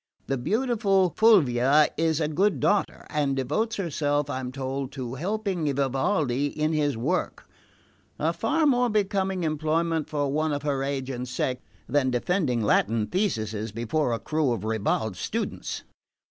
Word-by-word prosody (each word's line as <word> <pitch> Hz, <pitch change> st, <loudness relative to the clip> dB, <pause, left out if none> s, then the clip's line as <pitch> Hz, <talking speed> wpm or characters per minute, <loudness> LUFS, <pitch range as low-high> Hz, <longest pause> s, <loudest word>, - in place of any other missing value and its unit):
The 135 Hz, -, -1 dB
beautiful 205 Hz, -, +2 dB
Fulvia 150 Hz, -, +5 dB
is 160 Hz, -1 st, +1 dB
a 155 Hz, -, +1 dB
good 190 Hz, +7 st, +1 dB
daughter, 205 Hz, -1 st, 0 dB
and 145 Hz, -3 st, 0 dB
devotes 150 Hz, -, -1 dB
herself, 145 Hz, -5 st, -1 dB
I'm 130 Hz, -2 st, -4 dB
told, 135 Hz, 0 st, -4 dB
to 125 Hz, -3 st, -5 dB
helping 185 Hz, -, -1 dB
Vivaldi 140 Hz, 0 st, +1 dB
in 155 Hz, +2 st, -1 dB
his 145 Hz, -5 st, +1 dB
work; 150 Hz, +11 st, -2 dB, 0.7 s
a -, -, 0 dB
far 320 Hz, -1 st, +1 dB
more 250 Hz, -3 st, +3 dB
becoming 195 Hz, -3 st, 0 dB
employment 160 Hz, +1 st, 0 dB
for 145 Hz, -2 st, -1 dB
one 155 Hz, +1 st, 0 dB
of 145 Hz, 0 st, -3 dB
her 140 Hz, -2 st, 0 dB
age 135 Hz, -1 st, -2 dB
and 125 Hz, 0 st, -4 dB
sex 125 Hz, 0 st, -2 dB, 0.3 s
than 135 Hz, 0 st, +2 dB
defending 125 Hz, -, 0 dB
Latin 105 Hz, +1 st, +2 dB
theses 110 Hz, -, -2 dB
before 120 Hz, +5 st, -1 dB
a 115 Hz, -, 0 dB
crew 150 Hz, +2 st, 0 dB
of 105 Hz, -, -4 dB
ribald 110 Hz, -2 st, -1 dB
students." -, -, -4 dB
145 Hz, 145 wpm, -26 LUFS, 130-180 Hz, 0.7 s, Fulvia